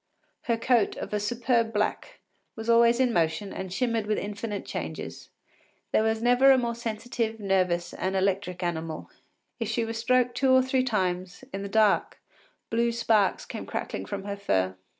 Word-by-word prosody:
Her 235 -2 +1
coat, 235 -1 +2
of - - -6
a 210 - +1
superb 230 +2 +1
black, 215 - -2 0.3
was 225 +1 -1
always 235 +1 +5
in 250 -2 +3
motion 165 +3 0
and 190 -1 -6
shimmered 230 0 0
with 215 - +1
infinite 205 +1 -4
changes. - - -6 0.6
There - - +3
never 245 +4 +4
was 270 - +8
a - - +2
more 235 -1 -1
sensitive, 230 0 -3
nervous, 180 -3 0
and 190 +1 -2
electric 190 -1 0
animal. 160 -2 -4 0.5
If - - -2
she 230 -3 0
were 225 - -4
stroked 245 +2 +2
two 265 +2 +2
or 260 0 +6
three 260 0 +1
times, 185 -4 -2
in 195 - -3
the 200 - -5
dark, 215 0 +2 0.5
blue 235 +1 +2
sparks 220 -4 +2
came - - -7
crackling - - -4
from 200 -1 -4
her 200 0 -4
fur. 95 - 0
220 Hz, 170 wpm, -27 LUFS, 195-235 Hz, 0.6 s, was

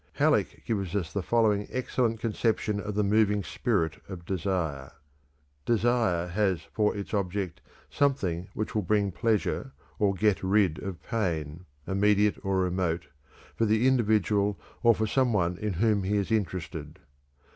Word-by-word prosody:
Halleck - - +1
gives 100 -4 -2
us 85 -5 -2
the 100 - -1
following 105 -1 +2
excellent 125 -3 -1
conception 110 -2 0
of 105 0 -5
the 105 - +2
moving 105 0 +2
spirit 85 -10 -1
of 90 -3 -8
desire: 85 -8 -2 0.7
"_Desire 115 -7 +1
has 95 -3 +1
for 105 -2 +1
its 100 - -6
object 95 -2 -2 0.3
something 95 -12 0
which 110 - -3
will 110 - +1
bring 100 +1 +1
pleasure 110 +2 -1 0.3
or 100 -2 +2
get 105 +1 +2
rid 95 -4 +2
of 95 -3 -6
pain, 85 - -2 0.2
immediate 105 +1 +2
or 95 -1 +1
remote, 90 -2 -1 0.5
for 115 - +1
the 110 +3 +2
individual 105 -5 +2 0.2
or 115 -2 +5
for 110 - 0
some 125 +2 +1
one 90 -3 +1
in 105 -2 -2
whom 105 +3 +2
he 100 +2 0
is 100 +2 -2
interested. 90 -7 -2
100 Hz, 145 wpm, -28 LUFS, 90-110 Hz, 0.7 s, or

